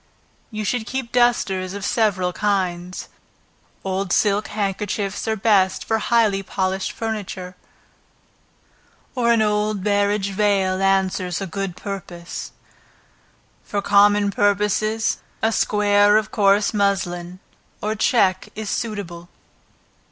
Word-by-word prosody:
You 215 Hz, -2 st, -4 dB
should 230 Hz, +1 st, -1 dB
keep 260 Hz, -2 st, -4 dB
dusters 200 Hz, -6 st, +1 dB
of 200 Hz, -1 st, -5 dB
several 190 Hz, -5 st, +1 dB
kinds. 185 Hz, -3 st, -2 dB, 0.8 s
Old 190 Hz, -1 st, -2 dB
silk 205 Hz, 0 st, +2 dB
handkerchiefs, 200 Hz, 0 st, -3 dB
are 220 Hz, -, +1 dB
best 195 Hz, -3 st, +2 dB
for 225 Hz, 0 st, +1 dB
highly 215 Hz, -3 st, +2 dB
polished 190 Hz, 0 st, -2 dB
furniture, 200 Hz, -5 st, -5 dB, 1.6 s
or 235 Hz, -3 st, +2 dB
an 230 Hz, -2 st, +4 dB
old 210 Hz, -1 st, 0 dB
barege 205 Hz, -1 st, +1 dB
veil 195 Hz, -2 st, +1 dB
answers 190 Hz, -2 st, +1 dB
a 195 Hz, -, -3 dB
good 190 Hz, 0 st, -4 dB
purpose. 180 Hz, -3 st, -7 dB, 1.1 s
For 205 Hz, -, -3 dB
common 205 Hz, 0 st, +4 dB
purposes, 210 Hz, +2 st, +1 dB, 0.2 s
a 225 Hz, -, +3 dB
square 205 Hz, -1 st, +3 dB
of 215 Hz, 0 st, -1 dB
coarse 200 Hz, +1 st, +3 dB
muslin, 180 Hz, -3 st, -1 dB, 0.4 s
or 215 Hz, +1 st, -1 dB
check 195 Hz, -4 st, +2 dB
is 215 Hz, -2 st, -4 dB
suitable. 185 Hz, -7 st, -4 dB
200 Hz, 110 wpm, -21 LUFS, 190-215 Hz, 1.6 s, an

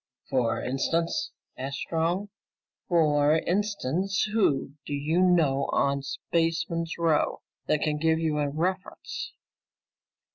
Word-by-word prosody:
"What 130 Hz, -, +3 dB
for 115 Hz, -, -1 dB
instance?" 165 Hz, +6 st, 0 dB, 0.3 s
asked 135 Hz, +1 st, -4 dB
Strong. 170 Hz, +7 st, -1 dB, 0.6 s
"For 150 Hz, -3 st, +4 dB
instance, 195 Hz, 0 st, 0 dB
who 170 Hz, -12 st, +2 dB
do 145 Hz, -, -3 dB
you 155 Hz, +5 st, +1 dB
know 160 Hz, -7 st, +3 dB
on 140 Hz, 0 st, +1 dB
Spaceman's 165 Hz, +3 st, -1 dB
Row 165 Hz, -2 st, +1 dB, 0.2 s
that 150 Hz, -, +2 dB
can 150 Hz, -1 st, 0 dB
give 160 Hz, +1 st, +2 dB
you 160 Hz, -2 st, 0 dB
a 145 Hz, -1 st, +1 dB
reference?" 180 Hz, +6 st, -3 dB
160 Hz, 115 wpm, -27 LUFS, 145-175 Hz, 0.6 s, For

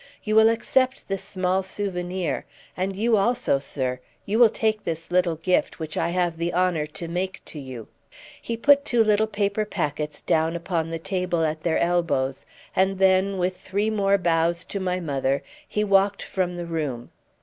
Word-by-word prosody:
You 215 Hz, 0 st, 0 dB
will 220 Hz, 0 st, +7 dB
accept 255 Hz, +3 st, +1 dB
this 195 Hz, -1 st, -2 dB
small 185 Hz, 0 st, 0 dB
souvenir; 185 Hz, -4 st, -3 dB, 0.3 s
and 190 Hz, +1 st, -2 dB
you 225 Hz, +2 st, +2 dB
also, 200 Hz, -, +2 dB
sir, 130 Hz, -2 st, -3 dB, 0.3 s
you 215 Hz, +3 st, 0 dB
will 235 Hz, -2 st, +8 dB
take 215 Hz, 0 st, 0 dB
this 165 Hz, 0 st, -5 dB
little 175 Hz, -2 st, +2 dB
gift, 180 Hz, +3 st, 0 dB
which 160 Hz, -1 st, -4 dB
I -, -, 0 dB
have 175 Hz, -1 st, 0 dB
the 170 Hz, +1 st, -2 dB
honour 175 Hz, -4 st, +1 dB
to 165 Hz, +2 st, -6 dB
make 185 Hz, +2 st, -3 dB
to 155 Hz, -, -8 dB
you." 130 Hz, -5 st, -8 dB, 0.5 s
He 230 Hz, -, -3 dB
put 280 Hz, +4 st, +5 dB
two 240 Hz, -5 st, +3 dB
little 215 Hz, 0 st, +3 dB
paper 205 Hz, 0 st, 0 dB
packets 150 Hz, -6 st, -3 dB
down 160 Hz, +1 st, +1 dB
upon 170 Hz, -1 st, -2 dB
the 165 Hz, -, -3 dB
table 180 Hz, -1 st, -1 dB
at 155 Hz, 0 st, -2 dB
their 160 Hz, 0 st, +1 dB
elbows, 165 Hz, -7 st, 0 dB, 0.3 s
and 190 Hz, +1 st, +2 dB
then, 190 Hz, +1 st, +3 dB
with 185 Hz, 0 st, 0 dB
three 200 Hz, +4 st, -1 dB
more 200 Hz, -2 st, +3 dB
bows 170 Hz, -1 st, +1 dB
to 200 Hz, -, -4 dB
my 185 Hz, -1 st, -1 dB
mother, 140 Hz, -4 st, -1 dB, 0.2 s
he 210 Hz, -, -1 dB
walked 200 Hz, 0 st, +3 dB
from 180 Hz, -2 st, -2 dB
the 175 Hz, -, -4 dB
room. 150 Hz, -8 st, -4 dB
180 Hz, 180 wpm, -24 LUFS, 165-200 Hz, 0.5 s, will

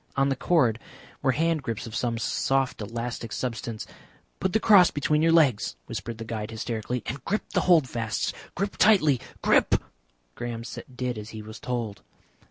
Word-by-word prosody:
On 135 Hz, 0 st, +3 dB
the 135 Hz, -, +1 dB
cord 130 Hz, -7 st, +2 dB, 0.4 s
were 130 Hz, -2 st, +2 dB
hand 165 Hz, +1 st, +1 dB
grips 115 Hz, -5 st, -4 dB
of 115 Hz, -, -8 dB
some 115 Hz, 0 st, 0 dB
soft 135 Hz, +2 st, 0 dB
elastic 115 Hz, +1 st, -4 dB
substance. 115 Hz, -1 st, -4 dB, 0.5 s
"Put 190 Hz, -, 0 dB
the 220 Hz, -, +4 dB
cross 200 Hz, -5 st, +7 dB
between 150 Hz, +1 st, +1 dB
your 165 Hz, +1 st, +4 dB
legs," 140 Hz, -, +3 dB
whispered 115 Hz, -1 st, -5 dB
the 115 Hz, -, -6 dB
guide 110 Hz, -1 st, -4 dB
hysterically, 115 Hz, +1 st, -3 dB
"and 130 Hz, +2 st, -5 dB
grip 210 Hz, -, -1 dB
the -, -, +3 dB
holdfasts. 125 Hz, -9 st, +2 dB, 0.2 s
Grip 200 Hz, +2 st, -2 dB
tightly, 155 Hz, -, +5 dB, 0.2 s
grip!" -, -, +4 dB, 0.6 s
Graham 115 Hz, -, -5 dB, 0.3 s
did 125 Hz, -2 st, -2 dB
as 105 Hz, +1 st, -8 dB
he 110 Hz, -1 st, -8 dB
was 110 Hz, +1 st, -9 dB
told. 115 Hz, -5 st, -3 dB
125 Hz, 165 wpm, -26 LUFS, 115-150 Hz, 0.6 s, cross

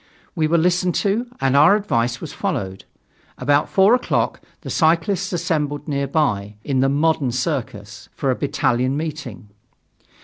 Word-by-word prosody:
We 160 Hz, -4 st, 0 dB
were 170 Hz, +2 st, +2 dB
listened 180 Hz, +1 st, +1 dB
to, 215 Hz, +4 st, 0 dB
and 135 Hz, 0 st, +1 dB
our 150 Hz, +8 st, +6 dB
advice 120 Hz, -, 0 dB
vas -, -, -8 dB
followed. 95 Hz, -1 st, -4 dB, 0.5 s
About 145 Hz, 0 st, +1 dB
four 195 Hz, +4 st, +4 dB
o'clock, 250 Hz, -, 0 dB, 0.2 s
the -, -, -7 dB
cyclists 175 Hz, +4 st, +1 dB
assembled 150 Hz, -4 st, -2 dB
nearby, 140 Hz, -8 st, -1 dB
in 135 Hz, -2 st, -1 dB
the 135 Hz, +1 st, +3 dB
"Modern" 145 Hz, -2 st, +1 dB
Circus, 120 Hz, -6 st, -4 dB
for 135 Hz, -, 0 dB
a -, -, 0 dB
battalion 135 Hz, -2 st, 0 dB
meeting. 145 Hz, -9 st, -6 dB
145 Hz, 140 wpm, -21 LUFS, 130-170 Hz, 0.5 s, our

